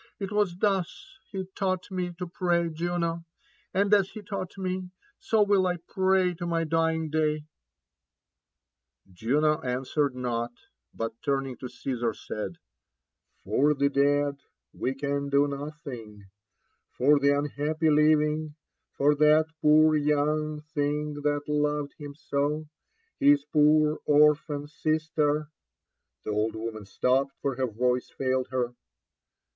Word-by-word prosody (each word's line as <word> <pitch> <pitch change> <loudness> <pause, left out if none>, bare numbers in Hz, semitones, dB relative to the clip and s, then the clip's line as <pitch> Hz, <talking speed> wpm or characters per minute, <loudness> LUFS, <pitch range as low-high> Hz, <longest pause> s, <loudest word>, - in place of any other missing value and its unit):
It 195 -1 -5
was 205 -4 +1
thus 205 - -2
he 190 -2 -4
tau^t 185 -1 -2
me 180 -1 -2
to 180 - -4
pray, 170 -1 0
Jupo; 170 0 -2 0.5
and 200 +2 +2
as 195 -2 +4
be 215 - -9
taught 195 -1 -5
me, 185 -1 -3 0.3
so 220 -2 +2
will 200 -2 +3
I 180 -1 0
pray 190 -1 +2
to 175 - -3
my 165 -1 0
dying 160 -1 0
day! 155 -1 +1 0.8
" 60 +9 -33
Juno 150 - +1
answered 130 +1 -1
not, 120 -1 -2 0.4
but 115 0 -5
turning 135 -2 -1
to 125 - -7
Caesar, 120 -5 -3
said, 105 +11 -5
*^ - - -22 0.9
For 150 +2 +2
the 140 0 +2
dead 140 0 +2 0.3
we 130 - -2
can 140 0 -2
do 140 +1 +3
nothing 140 -7 -7
i 100 +2 -35
^for 145 +3 +5
the 140 0 +4
unhappy 150 +2 0
living 150 0 +2 0.4
^for 145 +1 +4
that 155 +1 +5
poor 155 +1 +5
young 150 +1 0
thing 150 +1 -1
that 145 0 0
loved 150 -1 0
him 145 -1 -8
so, 145 +1 -1 0.3
— 455 0 -44
^his 145 0 +5
poor 150 0 +4
orphan 150 0 +3
sister 155 -1 0 0.3
" 60 0 -58
The - - -3
old 105 +2 0
woman 110 -2 -6
stopped, 135 +5 +1
for 140 - 0
her 130 -1 0
voice 125 +2 0
failed 130 -1 -1
her. 125 -2 -1
150 Hz, 140 wpm, -27 LUFS, 140-165 Hz, 0.9 s, ^for